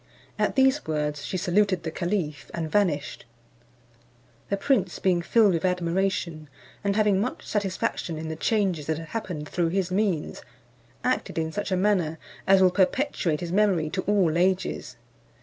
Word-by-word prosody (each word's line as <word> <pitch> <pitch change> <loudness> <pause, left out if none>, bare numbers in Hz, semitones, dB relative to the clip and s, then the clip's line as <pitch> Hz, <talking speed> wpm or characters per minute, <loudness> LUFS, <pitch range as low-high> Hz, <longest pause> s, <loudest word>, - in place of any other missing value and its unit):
At - - +1
these 265 +2 +3
words 150 -1 -2
she 185 - -3
saluted 185 0 +1
the 160 - -3
caliph, 170 -4 -2
and 160 -2 -3
vanished. 170 -9 0 1.3
The 200 - 0
prince 195 -6 +1
being 180 -2 +2
filled 205 +2 +4
with 165 - -1
admiration, 180 -3 -1 0.3
and 200 0 +1
having 205 -2 +3
much 245 - -3
satisfaction 190 -4 -2
in 160 +1 -5
the 160 - -4
changes 185 -5 0
that 160 -1 0
had 165 0 -8
happened 180 -9 -4
through 170 0 0
his 185 0 -1
means, 190 -5 -1 0.6
acted 255 - -1
in 160 0 -1
such 205 +2 -4
a 185 - +2
manner 180 -5 +1 0.3
as 190 0 +6
will 185 - +5
perpetuate 190 - +1
his 170 -1 -4
memory 185 -6 +2
to 185 - -1
all 185 -6 +3
ages. 185 +1 0
185 Hz, 160 wpm, -26 LUFS, 160-200 Hz, 1.3 s, as